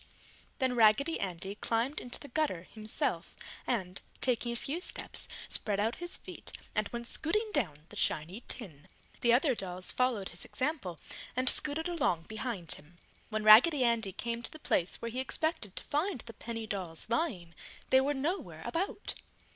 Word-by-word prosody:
Then 260 -3 +2
Raggedy 235 +8 +5
Andy 190 +1 -3
climbed 230 +6 0
into 245 - -5
the 285 - -9
gutter 265 - 0
himself 215 +3 -1 0.3
and, 185 -6 -1 0.2
taking 240 -2 +2
a - - -2
few 290 +8 -2
steps, - - -1 0.2
spread 205 -2 +1
out 225 +3 +1
his 350 +1 -1
feet - - -9 0.2
and 215 -1 +1
went 235 0 -5
scooting 425 - +1
down 155 - 0
the - - -9
shiny 170 +9 0
tin. 160 - -6 0.3
The 235 - +4
other 265 +3 +5
dolls 185 -4 -1
followed 245 -6 +1
his 170 - -4
example 255 - -2 0.4
and 255 +1 0
scooted 305 +5 +4
along 280 - +1
behind 215 - -4
him. 155 +4 -11 0.3
When 215 -1 -1
Raggedy 255 +7 +9
Andy 230 -4 +2
came 235 +4 -3
to - - -4
the - - -9
place 180 - +1
where 230 - -2
he 250 - -2
expected 265 - 0
to - - -4
find 300 - 0
the 230 - -9
penny 225 +1 -5
dolls 185 -6 -4
lying, 220 - -1 0.4
they 260 - +7
were 285 +2 +1
nowhere 320 +8 -2
about. 350 +4 -2
235 Hz, 170 wpm, -32 LUFS, 195-280 Hz, 0.4 s, Raggedy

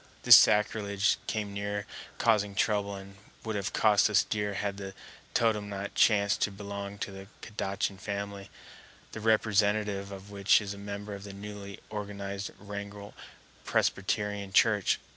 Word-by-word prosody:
This - - +11
sacrilege 105 -1 +3
came 105 -2 -2
near 100 0 -3 0.3
causing 105 -3 +2
trouble 100 -1 +1
and 100 0 -11 0.3
would 110 -1 -2
have 100 -1 -2
cost 105 -1 +4
us 105 - +4
dear 105 -1 -2
had 100 -1 -2
the 95 -1 -7 0.4
totem 105 -3 +2
not 100 0 -5
chanced 100 -2 +3
to 100 - +2
belong 100 0 -6
to 100 - -4
the 95 0 -10 0.2
Kadachan 100 -2 -3
family, 100 0 -5 0.6
the - - -6
representative 105 -2 +2
of 100 +1 -9
which 100 0 +4
is 100 -2 -5
a 100 - -10
member 100 +1 -6
of 100 0 -8
the 100 -1 -8
newly 100 0 -8
organized 100 -1 -5
Wrangell 100 0 -8 0.5
Presbyterian 100 0 0
Church. 105 -1 +4
100 Hz, 145 wpm, -29 LUFS, 100-105 Hz, 0.6 s, This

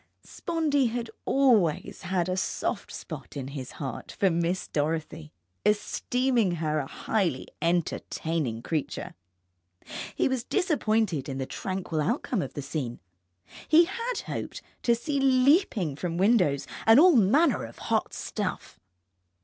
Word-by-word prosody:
Spondee 305 -6 0
had 235 0 -3
always 230 - +2
had 185 -2 0
a 185 - 0
soft 185 - -2
spot - - -8
in 135 -1 -4
his 135 -2 -7
heart 135 -3 -6
for 195 -2 +2
Miss 170 +2 0
Dorothy, 155 +1 -2 0.3
esteeming 230 +1 +1
her 155 -2 -1
a 135 - -3
highly 175 -8 -1
entertaining 160 -6 -1
creature. 155 -4 -3 1.0
He - - +2
was 260 -3 -1
disappointed 220 - 0
in 135 - -4
the 135 - -2
tranquil 185 -1 -3
outcome 235 - 0
of - - -6
the 145 - -4
scene. 135 -4 -4 0.7
He 330 +2 +7
had 465 +6 -3
hoped - - -5 0.2
to 235 - +3
see 280 +4 -2
leaping 260 - +3
from 170 +2 -3
windows 185 - +3 0.2
and 225 +4 +8
all 350 0 +7
manner 250 - +4
of - - -9
hot - - -1
stuff. 205 -4 -4
190 Hz, 135 wpm, -27 LUFS, 155-255 Hz, 1.0 s, and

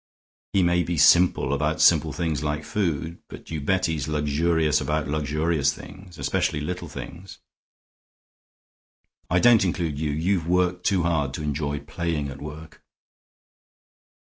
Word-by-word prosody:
He 95 - +3
may 85 0 +3
be 85 0 -2
simple 75 -2 +4
about 75 +2 -1
simple 80 -2 +4
things 80 -1 -2
like 75 0 -2
food, 85 -4 -2
but - - -12
you 80 -2 -3
bet 95 +6 +1
he's 80 -4 -2
luxurious 75 +1 +1
about 75 0 -1
luxurious 75 0 0
things, 95 -3 -12
especially 75 - -1
little 90 +3 -5
things. 75 +7 -9 1.9
I 90 - +2
don't 115 +3 +6
include 85 -5 -2
you; 80 -1 -1
you've 80 +3 0
worked 90 0 +1
too 95 -4 +2
hard 75 -5 0
to 75 - -5
enjoy 75 -1 -2
playing 80 -1 -3
at 70 0 -9
work." 75 +1 -10
80 Hz, 140 wpm, -24 LUFS, 75-85 Hz, 1.9 s, don't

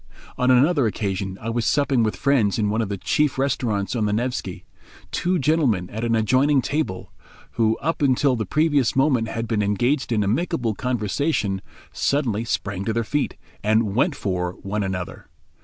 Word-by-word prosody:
On 125 - +1
another 135 +1 +4
occasion 95 -2 -3
I 115 - -4
was 120 0 -1
supping 140 -1 +2
with 110 -1 0
friends 125 -8 +2
in 105 -2 +1
one 110 +2 0
of 110 - -2
the 100 - -3
chief 150 +9 +1
restaurants 120 -6 -1
on 110 -3 0
the 105 - 0
Nevsky. 120 +3 -3 0.5
Two 180 +1 0
gentlemen 135 - +1
at 110 +2 -4
an 115 -1 +1
adjoining 130 +6 +3
table, 145 -11 -3 0.4
who 110 -1 +1
up 165 +1 -1
till 140 -1 +2
the 110 -4 -3
previous 145 - +2
moment 135 -4 +2
had 115 0 -4
been 110 -2 0
engaged 120 +7 0
in 105 -3 +2
amicable 120 - 0
conversation, 110 -2 -1 0.3
suddenly 120 -7 0
sprang 100 -4 -2
to 110 - 0
their 115 +1 0
feet, 145 +6 -2 0.3
and 110 -1 +2
"went 140 - +2
for" 90 -7 -2
one 105 +2 -2
another. 95 -1 -5
115 Hz, 175 wpm, -23 LUFS, 105-140 Hz, 0.5 s, another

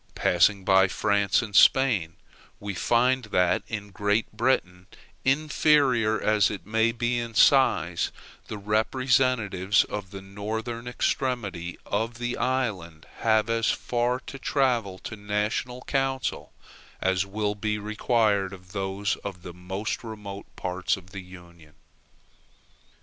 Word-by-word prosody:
Passing 95 +2 +2
by 95 0 +5
France 100 +3 +1
and 105 -3 -7
Spain, 100 -14 +4 0.4
we 100 -1 -5
find 125 +6 +2
that 90 -4 +2
in 100 -2 -6
Great 105 +3 0
Britain, 95 -7 0 0.4
inferior 135 -5 +3
as 105 -4 +3
it 100 -5 -7
may 110 +2 +2
be 120 +1 -1
in 115 -1 -6
size, 105 -9 +3 0.4
the 105 - -5
representatives 110 -2 +1
of 105 -2 -6
the 95 0 -9
northern 110 +4 -5
extremity 115 -9 -2
of 115 +3 -2
the 120 0 -3
island 100 -12 -2
have 110 -1 +2
as 115 0 +1
far 120 +1 0
to 135 - -9
travel 120 -10 0
to 110 - -8
the 100 - -17
national 105 +4 -2
council 135 -2 -2 0.5
as 95 0 +1
will 105 +1 -1
be 105 +1 -2
required 105 -2 0
of 90 -1 -13
those 100 +1 -2
of 95 -3 -8
the 90 - -8
most 95 +6 -4
remote 105 -3 -8
parts 90 +1 -1
of 95 0 -15
the 100 -1 -7
Union. 85 -4 -15
105 Hz, 130 wpm, -26 LUFS, 95-120 Hz, 0.5 s, by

